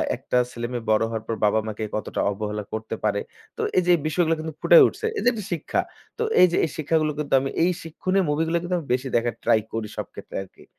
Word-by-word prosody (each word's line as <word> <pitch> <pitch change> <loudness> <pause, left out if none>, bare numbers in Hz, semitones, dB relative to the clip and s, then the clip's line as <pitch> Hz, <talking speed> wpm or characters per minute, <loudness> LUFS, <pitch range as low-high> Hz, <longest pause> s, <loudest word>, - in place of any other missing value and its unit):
একটা - - -2
ছেলেমেয়ে 120 0 -4
বড় 110 0 +4
হওয়ার 110 -1 -4
পর 115 - -1
বাবা 105 +1 +3
মাকে 110 0 -4
কতটা 110 - -3
অবহেলা 105 +1 -4
করতে 110 0 -4
পারে! 105 -1 +1 0.4
তো - - -2 0.2
এই 185 - +5
যে - - -1
এই - - -3
বিষয়গুলো 165 +1 +2
কিন্তু 160 0 -5
ফুটায় 170 0 +8
উঠছে। 425 +4 -5
এই - - -1
যে - - +5
একটা 215 -5 -5
শিক্ষা। 165 - -1 0.4
তো 460 - 0 0.2
এই 180 - +9
যে - - +1
এই - - -4
শিক্ষাগুলো 155 0 +1
কিন্তু 150 -2 -3
আমি 135 - -2
এই 180 - +4
শিক্ষনীয় 185 +4 0
মুভি 150 +2 +1
গুলো 170 +1 +1
কিন্তু 180 +1 -1 0.2
বেশি 130 +2 -1
দেখার 120 -1 +1
try 110 - +4
করি 110 -1 -2
সব - - -2
ক্ষেত্রে - - -10
আরকি। 95 - -18
140 Hz, 235 wpm, -24 LUFS, 110-170 Hz, 0.4 s, এই